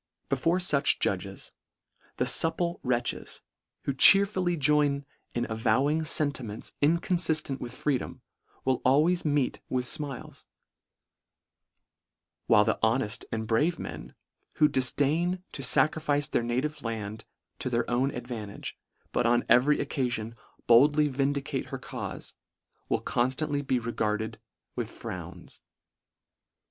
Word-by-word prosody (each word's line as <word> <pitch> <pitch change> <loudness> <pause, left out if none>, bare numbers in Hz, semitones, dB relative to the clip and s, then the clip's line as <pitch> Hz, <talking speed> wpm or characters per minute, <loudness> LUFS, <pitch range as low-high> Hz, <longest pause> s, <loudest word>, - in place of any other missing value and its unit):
Before 170 +2 +1
fuch 150 -6 +4
judges, 95 0 -3 0.7
the - - +1
fupple 170 +2 +2
wretches, 125 -1 -2 0.4
who 140 - -1
cheerfully 185 +3 +4
join 145 -1 +2 0.3
in 120 0 0
avo 110 +2 +1
wing 155 +2 +1
fentimentsinconfiftent 155 - 0
with 120 - -6
freedom, 135 -1 -2 0.4
will 130 -1 +1
always 155 +7 +3
meet 145 -3 0
with 125 -1 -1
fmiles: 145 -2 -4 2.0
while 105 -2 +5
the 110 - 0
ho 110 +3 +3
neft 125 -2 -2
and 110 0 -2
brave 150 +10 +1
men, 60 - -8 0.4
who 150 - +5
difdain 155 +8 +1
to - - -7
facrifice 145 +1 +2
their - - +2
native 130 +6 -2
land 110 -2 -5 0.4
to 130 - -1
their 120 -1 0
own 125 +3 +1
advantage, 120 -6 -7 0.3
but 120 - +1
on 120 0 +2
every 130 +6 +5
occafion, 120 -5 -2 0.3
boldly 145 +5 +5
vindicate 140 +1 -2
her - - -5
caufe, - - -7 0.6
will - - 0
conftantly 140 +4 0
be 130 -2 0
regarded 110 -2 -2 0.4
with - - -3
frowns. - - -9
135 Hz, 115 wpm, -28 LUFS, 120-150 Hz, 2.0 s, while